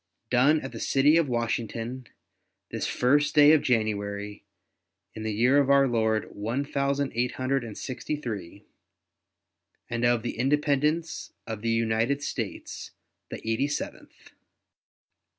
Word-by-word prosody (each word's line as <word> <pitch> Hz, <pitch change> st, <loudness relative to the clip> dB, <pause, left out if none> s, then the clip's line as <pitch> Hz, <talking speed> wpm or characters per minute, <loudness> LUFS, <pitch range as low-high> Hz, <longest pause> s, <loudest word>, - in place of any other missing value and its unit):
Done 140 Hz, +5 st, +4 dB
at 135 Hz, -, -6 dB
the -, -, -8 dB
city 145 Hz, +3 st, +3 dB
of 165 Hz, -4 st, +2 dB
Washington, 120 Hz, +1 st, -3 dB, 0.6 s
this -, -, -2 dB
first 145 Hz, +4 st, +2 dB
day 150 Hz, 0 st, +8 dB
of 155 Hz, -2 st, +5 dB
January, 105 Hz, -3 st, -1 dB, 0.7 s
in 110 Hz, -, -8 dB
the 110 Hz, 0 st, -2 dB
year 125 Hz, +7 st, +4 dB
of 140 Hz, -1 st, +2 dB
our 140 Hz, -1 st, +5 dB
Lord 110 Hz, -2 st, 0 dB
one 115 Hz, +7 st, -2 dB
thousand 140 Hz, 0 st, -1 dB
eight 120 Hz, +2 st, 0 dB
hundred 130 Hz, 0 st, -1 dB
and 110 Hz, -3 st, -8 dB
sixty 130 Hz, +3 st, -4 dB
three, 105 Hz, -, -7 dB, 1.3 s
and 115 Hz, 0 st, -2 dB
of 120 Hz, -2 st, +3 dB
the 120 Hz, -, -4 dB
Independence 150 Hz, +4 st, 0 dB
of 110 Hz, -2 st, -5 dB
the 115 Hz, -, -1 dB
United 115 Hz, +5 st, +1 dB
States -, -, -5 dB, 0.4 s
the -, -, -8 dB
eighty 115 Hz, +5 st, +1 dB
seventh. 145 Hz, -, -7 dB
125 Hz, 135 wpm, -27 LUFS, 110-140 Hz, 1.3 s, day